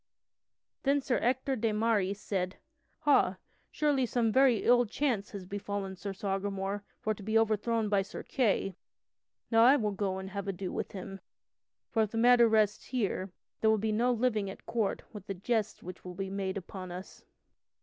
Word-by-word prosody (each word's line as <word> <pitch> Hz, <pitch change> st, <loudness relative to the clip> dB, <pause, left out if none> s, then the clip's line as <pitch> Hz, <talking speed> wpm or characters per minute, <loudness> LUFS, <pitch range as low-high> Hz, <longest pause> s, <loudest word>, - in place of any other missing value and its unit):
Then 280 Hz, +1 st, +3 dB
Sir 260 Hz, -2 st, 0 dB
Ector 260 Hz, +2 st, +1 dB
de 225 Hz, 0 st, +1 dB
Maris 210 Hz, -3 st, +1 dB
said: 185 Hz, -2 st, -2 dB, 0.5 s
"Ha, 280 Hz, -11 st, +4 dB, 0.3 s
surely 285 Hz, -4 st, +1 dB
some 230 Hz, -1 st, +1 dB
very 260 Hz, -2 st, +4 dB
ill 245 Hz, 0 st, +5 dB
chance 220 Hz, -4 st, -1 dB
has 200 Hz, -3 st, -7 dB
befallen 200 Hz, 0 st, -4 dB
Sir 200 Hz, +2 st, -5 dB
Sagramore 195 Hz, 0 st, -2 dB, 0.2 s
for 215 Hz, -, 0 dB
to 210 Hz, -, -12 dB
be 220 Hz, +3 st, +1 dB
overthrown 225 Hz, 0 st, +1 dB
by 200 Hz, -1 st, +3 dB
Sir 195 Hz, -, -7 dB
Kay. 200 Hz, -7 st, 0 dB, 0.8 s
Now 225 Hz, 0 st, +6 dB
I 260 Hz, +4 st, +8 dB
will 215 Hz, -6 st, 0 dB
go 195 Hz, -1 st, -2 dB
and 190 Hz, 0 st, -6 dB
have 200 Hz, 0 st, -4 dB
ado 190 Hz, -1 st, -3 dB
with -, -, -4 dB
him, 195 Hz, 0 st, -7 dB, 0.7 s
for 225 Hz, -, +2 dB
if 215 Hz, -, +1 dB
the 225 Hz, -, -5 dB
matter 240 Hz, 0 st, +6 dB
rests 215 Hz, -1 st, +2 dB
here 200 Hz, -6 st, -2 dB, 0.3 s
there 220 Hz, -, +3 dB
will 220 Hz, -, +4 dB
be 215 Hz, +1 st, -1 dB
no 235 Hz, +4 st, +2 dB
living 220 Hz, -4 st, +1 dB
at 190 Hz, -, -10 dB
court 225 Hz, -4 st, -1 dB
with 205 Hz, -3 st, -9 dB
the 195 Hz, -, -3 dB
jests 215 Hz, +3 st, -1 dB
which 180 Hz, +1 st, -9 dB
will 180 Hz, -1 st, -8 dB
be 195 Hz, 0 st, -4 dB
made 195 Hz, -1 st, -2 dB
upon 185 Hz, -1 st, -7 dB
us." 180 Hz, +2 st, -9 dB
210 Hz, 180 wpm, -31 LUFS, 195-230 Hz, 0.8 s, I